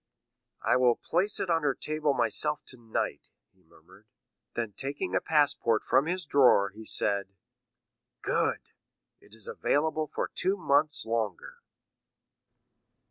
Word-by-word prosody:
"I - - +3
will 125 -2 +4
place 195 +5 0
it 180 - -1
on 165 -1 +2
her 145 -3 0
table 155 -2 -1
myself 150 +6 -1
tonight," 120 -3 -5 0.2
he - - -32
murmured. - - -21 0.5
Then 115 -3 -3
taking 135 -8 -4
a 95 - +2
passport 145 -7 +2
from 135 +4 +2
his 180 0 -2
drawer 130 -9 +4
he 110 +2 -12
said,—"Good, 100 -3 -2 0.5
it 105 - -18
is 110 -3 -2
available 155 +1 0
for - - -3
two 190 +2 0
months 145 -3 +2
longer." 110 -5 -3
135 Hz, 125 wpm, -28 LUFS, 110-155 Hz, 0.5 s, will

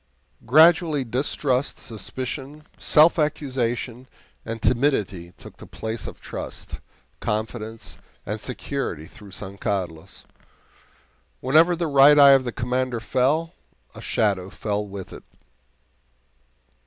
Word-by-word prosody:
Gradually 160 +1 +5
distrust, 130 +2 -1
suspicion, 130 +6 -6
self 160 +2 +5
accusation, 130 -4 -2 0.4
and 115 0 -5
timidity 110 -8 0
took - - -13
the - - -12
place 110 0 -5
of - - -9
trust, - - -7 0.4
confidence, 110 +1 -4 0.3
and 105 +1 -4
security 125 - -4
throughout 100 +3 -12
San 100 0 -7
Carlos. 90 -7 -4 1.1
Whenever 160 +7 +4
the 170 0 -2
Right 145 0 +6
Eye 140 -1 +9
of 135 -1 +5
the 120 - -2
Commander 125 +1 -2
fell, 135 +8 0 0.4
a - - -11
shadow 95 -4 0
fell 105 +1 -3
with 100 -1 -8
it. - - -10
125 Hz, 110 wpm, -24 LUFS, 105-145 Hz, 1.1 s, Eye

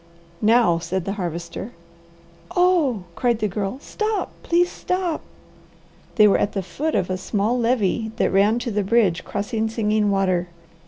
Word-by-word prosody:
"Now!" 215 -6 +4
said 175 +2 -3
the 195 - -2
Harvester. 175 +2 -5 0.8
"Oh," 335 - +3
cried 240 -2 +1
the 215 - 0
Girl. 200 +4 -3
"Stop! 430 +7 -2
Please 350 +1 +2
stop!" 365 -3 -2 0.9
They 215 -3 +7
were 200 - +3
at 205 - 0
the 195 - -2
foot 310 - -3
of 185 - 0
a 185 - -1
small 205 +4 0
levee 230 -2 +1
that - - +1
ran 205 +4 +4
to 240 - -2
the 210 0 0
bridge 195 -4 +2
crossing 220 +2 -2
Singing 215 -2 +1
Water. 185 -3 +1
215 Hz, 155 wpm, -22 LUFS, 195-245 Hz, 0.9 s, They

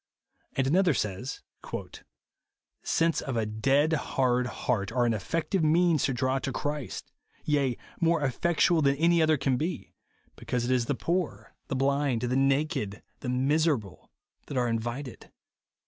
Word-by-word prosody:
And 135 - +1
another 170 +2 +3
says, 105 +5 -3 0.7
" - - -59 0.6
Sense 165 0 +1
of 130 -4 -3
a 110 - +1
dead, 135 +9 +2
hard 125 -4 +1
heart 110 -5 -2
are 125 -1 +2
an 115 - +2
effec 155 +11 -2
tual 195 -3 +2
means 160 0 +3
to 135 - 0
draw 130 +1 +1
to 135 +1 -3
Christ; 145 0 -4 0.3
yea, 140 -5 +1 0.2
more 165 -1 +2
eifectual 160 +4 +2
than 140 0 +3
any 170 +3 +3
other 155 -1 +4
can 135 -2 +1
be, 165 +4 -4 0.4
because 125 -1 -2
it 125 - -1
is 125 -2 +2
the 140 - 0
poor, 130 - -2
the - - -2
blind, 135 -2 +1
the 125 +1 0
naked, 135 -6 0 0.2
the 125 - -5
miserable, 135 - 0 0.4
that 140 - -4
are 125 -1 +2
invited." 120 +3 -4
135 Hz, 155 wpm, -28 LUFS, 125-155 Hz, 0.7 s, other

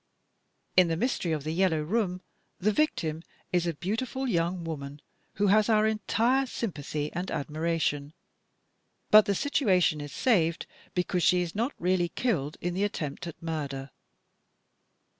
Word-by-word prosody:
In 185 -1 +6
"The 165 -1 -1
Mystery 190 -5 0
of 155 -3 -1
the 155 +2 -2
Yellow 165 -3 +2
Room," 185 0 -1 0.3
the 210 +4 +2
victim 165 - 0 0.3
is 175 -1 +2
a 170 - -1
beautiful 235 - -2
young 175 -3 0
woman 145 -3 -6 0.3
who 205 - 0
has 215 +2 +4
our 215 -1 +4
entire 230 +5 +1
sympathy 150 - -4
and 180 +2 -3
admiration, 155 -1 -1 1.0
but 215 0 +9
the 200 - +1
situation 185 - +2
is 145 -1 -7
saved 170 -9 +1 0.3
because 180 0 0
she 180 +1 +4
is 170 - -6
not 235 +7 -1
really 180 -1 +1
killed 160 - -1
in 175 0 -2
the 190 +3 0
attempt 165 -6 -3
at 170 - -8
murder. 145 -4 -4
175 Hz, 145 wpm, -28 LUFS, 155-210 Hz, 1.0 s, but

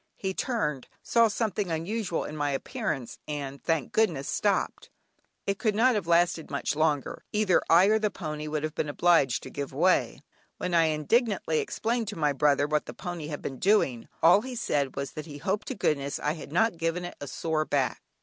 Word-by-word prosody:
He 190 -1 -3
turned, 150 - -2 0.2
saw 230 -1 +4
something 210 -3 -1
unusual 175 +3 -2
in 150 - -6
my 145 -1 0
appearance, 140 - -3
and, 140 -2 -5
thank 165 -6 -1
goodness! 165 -11 +1
stopped. 205 -2 0 0.6
It 200 0 -1
could 215 -4 +1
not 250 +4 +4
have 205 -6 -2
lasted 170 -1 +2
much 140 0 -2
longer; 150 -3 0
either 210 -3 +3
I 170 +3 +7
or 215 +2 +4
the 215 -1 +1
pony 155 -5 -5
would 150 0 -2
have 155 -1 -2
been 150 - -2
obliged 145 -5 +3
to - - -9
give 140 -1 -5
way. 175 +7 +2 0.3
When 180 - -3
I 165 -1 +5
indignantly 160 - +1
explained 230 0 -1
to 205 - -4
my 150 -2 +2
brother 145 0 +3
what 150 0 0
the - - -8
pony 175 -4 -5
had 150 -2 -6
been 135 - -5
doing, 175 - +2 0.2
all 175 +5 +7
he 255 +1 -6
said 145 - -1
was 140 0 -3
that 155 +1 -7
he 145 -2 -8
hoped 195 +8 -2
to 260 - -3
goodness 140 -7 0
I 150 - -1
had 155 -3 -9
not 215 +2 +2
given 165 +2 -1
it 175 - -6
a 145 - -5
sore 155 +2 -1
back. 135 -4 0
165 Hz, 200 wpm, -28 LUFS, 145-205 Hz, 0.6 s, I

